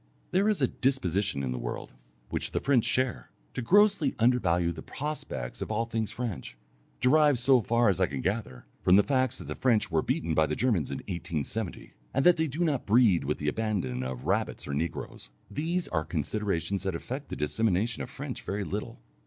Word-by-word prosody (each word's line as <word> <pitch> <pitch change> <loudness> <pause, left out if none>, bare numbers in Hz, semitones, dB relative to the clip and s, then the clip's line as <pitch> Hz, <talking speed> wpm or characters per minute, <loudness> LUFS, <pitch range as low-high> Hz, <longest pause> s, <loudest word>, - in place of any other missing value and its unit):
There 195 +3 +3
is 205 -10 +1
a - - +5
disposition 100 - 0
in 65 - -2
the 65 - -3
world, - - -5 0.4
which - - -1
the - - +1
French 135 -5 +3
share, 125 - 0 0.2
to - - -3
grossly 200 - +4
undervalue 90 -8 +2
the 80 -2 -7
prospects 135 - -5
of - - -3
all 110 +2 0
things 115 -2 -2
French, 95 - -5 0.4
derived, 145 +1 +5
so 125 +1 +4
far 115 +2 +2
as 95 -4 +2
I - - +4
can 70 -1 -4
gather, 95 - -3 0.2
from 90 - +5
the 105 - +6
facts 130 -3 +1
that - - -7
the - - -5
French 115 -7 +1
were 80 -1 +3
beaten 80 +1 -1
by 80 0 +3
the 75 - -1
Germans 110 - +1
in - - -5
1870, 85 +3 -4 0.2
and 135 - +2
that 180 -1 +7
they 160 0 +1
do 155 +5 -2
not 150 -6 0
breed 105 - +4
with 75 +2 -1
the 75 - -4
abandon 90 - -1
of 65 -1 -5
rabbits - - -1
or 70 - -3
negroes. 75 -3 -4 0.2
These 170 +4 -1
are 80 -3 0
considerations 90 +3 -1
that 95 -2 -2
affect 135 - -6
the - - -4
dissemination 110 +7 0
of - - -5
French 140 -2 -6
very 100 +1 -3
little. 80 - -5
105 Hz, 200 wpm, -29 LUFS, 80-130 Hz, 0.4 s, that